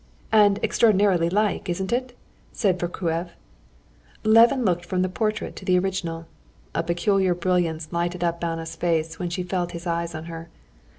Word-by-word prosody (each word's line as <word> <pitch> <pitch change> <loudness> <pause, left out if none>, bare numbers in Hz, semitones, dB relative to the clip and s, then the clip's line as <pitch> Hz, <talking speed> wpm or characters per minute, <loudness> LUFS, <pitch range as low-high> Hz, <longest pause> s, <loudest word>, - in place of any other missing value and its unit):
"And 205 -2 +5
extraordinarily 195 -6 +3
like, 205 0 0
isn't 190 +4 -2
it?" 250 0 -2 0.3
said 190 -5 0
Vorkuev. 175 -1 -2 0.9
Levin 230 +4 +5
looked 175 -2 +1
from 180 +1 -1
the 185 - 0
portrait 215 +3 -2
to - - -9
the 185 -1 +3
original. 180 -3 -2 0.5
A - - +1
peculiar 180 +2 +1
brilliance 170 -3 0
lighted 175 +1 -2
up 170 0 -1
Anna's 165 -1 -3
face 165 -1 -1
when 175 - -2
she 180 +1 -3
felt 180 -1 -2
his 170 +1 -7
eyes 170 -1 -2
on 155 +1 -6
her. 165 0 -8
175 Hz, 160 wpm, -24 LUFS, 170-195 Hz, 0.9 s, And